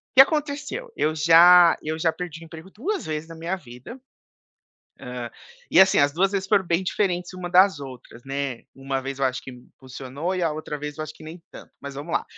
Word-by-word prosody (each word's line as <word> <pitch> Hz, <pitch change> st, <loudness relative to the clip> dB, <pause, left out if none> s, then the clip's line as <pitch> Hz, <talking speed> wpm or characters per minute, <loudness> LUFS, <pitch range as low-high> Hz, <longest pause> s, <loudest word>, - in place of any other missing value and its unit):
que 260 Hz, -, +11 dB
aconteceu? 300 Hz, -, -1 dB
Eu 155 Hz, -, 0 dB
já 170 Hz, +2 st, +7 dB
eu 155 Hz, +1 st, -4 dB
já 165 Hz, 0 st, +1 dB
perdi 170 Hz, -2 st, -7 dB
o -, -, -11 dB
emprego 165 Hz, +3 st, -12 dB
2 375 Hz, -, -4 dB
vezes 155 Hz, 0 st, -4 dB
na 165 Hz, -, -10 dB
minha 170 Hz, +4 st, -3 dB
vida, 130 Hz, -, -12 dB, 1.0 s
hã, 125 Hz, -2 st, -7 dB, 0.4 s
e -, -, +6 dB
assim, 190 Hz, 0 st, +6 dB
as 140 Hz, 0 st, +3 dB
2 190 Hz, +4 st, +1 dB
vezes 195 Hz, -1 st, -2 dB
foram 195 Hz, -1 st, +2 dB
bem 170 Hz, +2 st, +1 dB
diferentes 180 Hz, -2 st, -1 dB
uma 180 Hz, -1 st, -6 dB
das 185 Hz, -2 st, +4 dB
outras, 130 Hz, -3 st, -11 dB
né. 135 Hz, -3 st, -4 dB
Uma 135 Hz, 0 st, -3 dB
vez, 135 Hz, 0 st, -6 dB
eu 135 Hz, -, +2 dB
acho 130 Hz, 0 st, -2 dB
que -, -, -10 dB
impulsionou 130 Hz, +6 st, -7 dB
e 180 Hz, -, -1 dB
a 165 Hz, -, +1 dB
outra 150 Hz, -1 st, -6 dB
vez, 150 Hz, +1 st, -7 dB
eu 155 Hz, -, -2 dB
acho 155 Hz, -, -8 dB
que -, -, -15 dB
nem 165 Hz, +3 st, -10 dB
tanto, -, -, -13 dB
mas 140 Hz, -1 st, -8 dB
vamos 145 Hz, +4 st, -6 dB
lá. -, -, +1 dB
160 Hz, 220 wpm, -24 LUFS, 140-185 Hz, 1.0 s, que